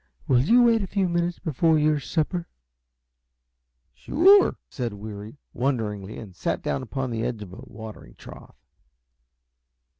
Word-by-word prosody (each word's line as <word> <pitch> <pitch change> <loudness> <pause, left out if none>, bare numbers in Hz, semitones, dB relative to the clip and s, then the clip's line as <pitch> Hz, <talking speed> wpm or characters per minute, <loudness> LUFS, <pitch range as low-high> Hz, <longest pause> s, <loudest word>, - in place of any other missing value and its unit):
Will 125 - +4
you 235 - +5
wait 230 -2 +4
a 195 - -3
few 195 -1 0
minutes 175 0 -1
more 160 - -2
for 160 +4 +3
your 150 0 +2
supper?" 170 +5 -2 1.5
"Sure," 375 - +5
said 120 -6 -4
Weary; 105 +3 -8 0.2
wonderingly, 110 -6 -2
and 100 -5 -10
sat - - -2
down - - -1
upon 130 0 -4
the 115 -1 -2
edge 115 -4 -3
of 95 - -12
the 100 +6 -10
watering 110 - -11
trough. - - -13
130 Hz, 145 wpm, -25 LUFS, 110-175 Hz, 1.5 s, you